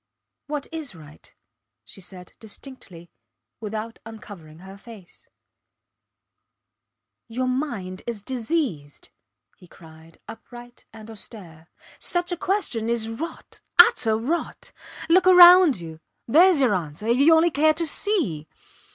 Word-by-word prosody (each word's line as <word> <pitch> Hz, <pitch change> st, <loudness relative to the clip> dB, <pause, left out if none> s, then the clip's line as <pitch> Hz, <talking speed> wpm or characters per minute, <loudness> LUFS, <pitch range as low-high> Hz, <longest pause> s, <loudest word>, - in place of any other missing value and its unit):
What 290 Hz, -1 st, -5 dB
is 315 Hz, -, -7 dB
right? 155 Hz, -2 st, -16 dB, 0.5 s
she 195 Hz, -, -13 dB
said, 180 Hz, -1 st, -13 dB
distinctly, 205 Hz, -7 st, -13 dB, 0.5 s
without 220 Hz, +1 st, -7 dB
uncovering 205 Hz, -8 st, -13 dB
her 190 Hz, +1 st, -12 dB
face. 200 Hz, -3 st, -16 dB, 2.0 s
Your 245 Hz, +3 st, -3 dB
mind 240 Hz, -9 st, -4 dB
is 225 Hz, -4 st, -5 dB
diseased! 235 Hz, -, -4 dB, 0.5 s
he 180 Hz, -, -18 dB
cried, 160 Hz, -1 st, -18 dB
upright 240 Hz, +2 st, -13 dB
and 220 Hz, 0 st, -13 dB
austere. 180 Hz, -7 st, -11 dB, 0.3 s
Such 350 Hz, 0 st, -1 dB
a -, -, -1 dB
question 345 Hz, -, -2 dB
is 230 Hz, -1 st, -1 dB
rot 320 Hz, +9 st, -9 dB, 0.2 s
utter 225 Hz, -10 st, +5 dB
rot. 290 Hz, +10 st, -5 dB, 0.4 s
Look 360 Hz, +2 st, +3 dB
round 355 Hz, -, +7 dB
you 160 Hz, -2 st, -10 dB, 0.3 s
theres 340 Hz, +6 st, +4 dB
your 250 Hz, -5 st, +2 dB
answer, 165 Hz, +1 st, -5 dB
if 235 Hz, +2 st, +1 dB
you 310 Hz, +5 st, +5 dB
only 330 Hz, +1 st, +2 dB
care 310 Hz, +2 st, +2 dB
to 335 Hz, +1 st, -1 dB
see. 285 Hz, -, -2 dB
230 Hz, 120 wpm, -23 LUFS, 185-310 Hz, 2.0 s, round